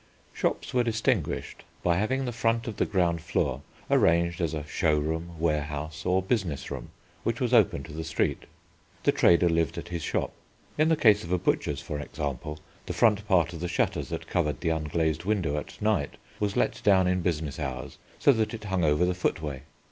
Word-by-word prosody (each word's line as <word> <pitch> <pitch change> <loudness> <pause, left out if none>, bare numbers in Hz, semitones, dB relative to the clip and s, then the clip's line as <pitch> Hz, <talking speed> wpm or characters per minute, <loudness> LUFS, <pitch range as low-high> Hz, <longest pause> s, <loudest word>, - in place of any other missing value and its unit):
Shops - - -2
were 125 -1 +3
distinguished 115 - -1 0.2
by 85 -1 +3
having 130 +7 0
the 125 - -2
front 115 0 0
of 110 - -5
the - - +1
ground 85 -4 +1
floor 65 -4 -1 0.3
arranged 85 +1 +3
as 80 -2 0
a 75 -1 -4
show 75 0 +1
room, 80 +3 -3
warehouse, 75 0 -2
or 95 +1 +2
business 95 - -1
room - - -6 0.3
which - - -1
was - - 0
open 70 - +4
to 75 - -10
the 80 +1 -4
street. 80 0 -1 0.6
The - - +4
trader 85 0 +4
lived 80 -2 +1
at - - -6
his 85 -2 -3
shop. - - -1 0.4
In 155 +1 +3
the 160 - +4
case 105 -7 +5
of 85 - -7
a 90 - +3
butcher's, 75 -3 0
for 75 -1 -5
example, 75 0 -4 0.3
the - - -2
front 105 -2 +3
part 85 -4 +3
of 85 - -7
the 90 - -2
shutters - - -1
that - - -4
covered 75 -1 -1
the 85 - +1
unglazed 80 0 0
window 95 -8 0
at 75 - -7
night, 105 -9 0 0.2
was 105 -1 -1
let - - +1
down 95 -3 +5
in 90 0 +1
business 80 -4 -2
hours 65 -3 -5 0.2
so - - +5
that 110 -1 0
it 110 - -9
hung 95 -3 -1
over 75 +3 +3
the 90 - +1
footway. 75 -6 -2
85 Hz, 200 wpm, -27 LUFS, 75-100 Hz, 0.6 s, case